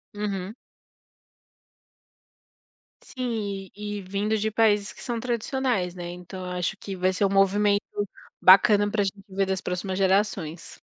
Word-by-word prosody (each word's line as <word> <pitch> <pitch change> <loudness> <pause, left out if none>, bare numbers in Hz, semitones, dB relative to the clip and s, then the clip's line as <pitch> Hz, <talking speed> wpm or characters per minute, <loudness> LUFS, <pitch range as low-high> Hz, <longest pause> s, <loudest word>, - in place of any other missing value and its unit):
Uhum. 200 -1 -3 2.5
Sim. 210 -7 -4
E 210 0 -5
e - - -7
vindo 200 +3 -1
de 215 +1 -1
países 210 -2 +2
que - - -14
são 240 -2 -2
tradicionais, 240 -5 -1
né. 175 -1 -6
Então, 180 +1 -8
eu 180 - -5
acho 180 +4 -1
que 195 -1 -6
vai 185 +1 +1
ser 200 - +1
um 195 - +2
movimento 200 +1 +3 0.6
bacana 205 +2 +7
para 205 -1 +1
gente 195 0 -4
ver 195 +1 0
das 190 0 -2
próximas 185 +1 -3
gerações. 190 -4 0
200 Hz, 145 wpm, -26 LUFS, 190-210 Hz, 2.5 s, bacana